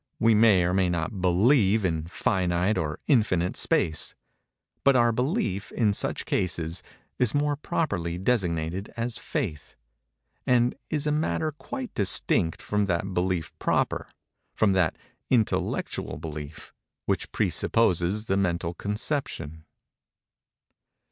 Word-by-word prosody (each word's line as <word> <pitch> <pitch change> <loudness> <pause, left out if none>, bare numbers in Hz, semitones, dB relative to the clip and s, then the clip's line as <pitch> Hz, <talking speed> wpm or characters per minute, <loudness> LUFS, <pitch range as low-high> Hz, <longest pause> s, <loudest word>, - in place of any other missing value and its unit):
We 115 0 +5
may 105 -4 +5
or 90 +1 +1
may 95 -1 +2
not 85 +3 -2
believe 100 +3 +4
in 80 -3 -1
finite 90 +2 0
or 75 -4 -2
in 135 -5 +5
infinite 90 -5 0
space; 80 -2 +1 0.7
but 140 -1 +5
our 120 -1 +4
belief, 120 - -1
in 105 -4 +2
such - - -2
cases, 85 -2 -1 0.4
is 125 -1 +2
more 145 0 +1
properly 90 - -2
designated 90 -3 -1
as 115 0 -2
faith, 90 - -4 0.7
and 125 -1 +3 0.2
is 150 -1 -1
a 150 - +1
matter 155 +1 0
quite 250 - -7
distinct 90 -4 +1
from 105 -1 0
that 95 +1 -1
belief 90 -2 -1
proper—from 105 -3 -1
that 90 -4 +1 0.3
intellectual 115 -5 0
belief—which 75 -1 -6
presupposes 100 -1 +1
the 95 -2 0
mental 85 -3 0
conception. 100 - -4
95 Hz, 115 wpm, -26 LUFS, 85-120 Hz, 0.7 s, We